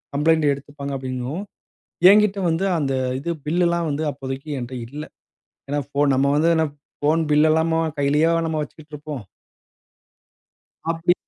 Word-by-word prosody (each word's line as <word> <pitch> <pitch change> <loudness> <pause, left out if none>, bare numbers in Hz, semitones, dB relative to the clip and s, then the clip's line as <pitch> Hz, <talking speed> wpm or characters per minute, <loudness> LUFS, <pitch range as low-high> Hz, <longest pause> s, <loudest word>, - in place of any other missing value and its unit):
Complaint 160 +2 +3
எடுத்துப்பாங்க 140 0 -7
அப்பிடிங்கவும், 130 +7 -4 0.7
என்கிட்ட 210 -1 +4
வந்து 165 +4 0
அந்த 135 -2 0 0.3
இது 170 +5 -3 0.2
பில் 175 +3 +2
எல்லாம் 170 -1 0
வந்து 150 +2 -1
அப்போதைக்கு 135 +1 -6
என்ட்ட 125 +1 -6
இல்ல. 150 +4 -7 0.7
ஏன்னா 145 +1 0
ஃபோன் 140 -1 +2
நம்ம 140 +1 +3
வந்து 165 +3 +3
என்ன 160 0 +2 0.3
ஃபோன் 155 +3 +2
பில் 150 +1 +5
எல்லாமாவா 160 0 +2
கையிலேயேவா 150 +4 +3
நம்ம 155 -1 -1
வச்சுக்கிட்டு 150 0 -11
இருப்போம்? 145 -4 -6 1.7
அப்பிடி 165 +1 +2
150 Hz, 140 wpm, -22 LUFS, 140-165 Hz, 1.7 s, பில்